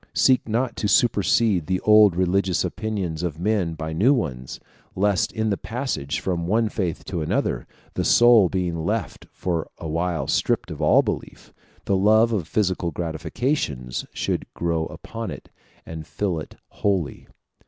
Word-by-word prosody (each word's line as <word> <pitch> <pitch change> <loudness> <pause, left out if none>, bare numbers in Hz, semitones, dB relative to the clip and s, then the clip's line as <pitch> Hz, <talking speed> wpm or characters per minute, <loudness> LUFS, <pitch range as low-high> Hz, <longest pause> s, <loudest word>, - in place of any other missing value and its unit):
Seek 130 -3 +3
not 115 +2 0
to 105 - 0
supersede 105 -4 +3
the 90 0 0
old 105 -4 +6
religious 95 0 +1
opinions 100 -6 -3
of 85 -3 -3
men 95 -4 0
by 80 +1 -5
new 115 - +4
ones; 65 - -4 0.4
lest 100 -1 +1
in 110 -1 -1
the 100 - 0
passage 115 - -3
from 85 -2 -2
one 110 +3 +2
faith 90 -6 -3
to 85 -4 -3
another, 75 - -1 0.3
the - - -1
soul 120 -6 +6
being 90 -4 -2
left 110 +5 -3
for 85 -3 -3
a 80 - -6
while 85 +1 -1
stripped - - 0
of - - -6
all - - +5
belief, - - -6 0.3
the 100 - +1
love 110 +4 +4
of 95 -7 -1
physical 95 -4 0
gratifications 80 - -3
should - - -3
grow 85 -2 -1
upon 115 0 -7
it - - -9 0.3
and 80 -1 -8
fill 95 -6 -2
it 75 - -9
wholly. 95 -9 -2
95 Hz, 155 wpm, -23 LUFS, 80-110 Hz, 0.4 s, old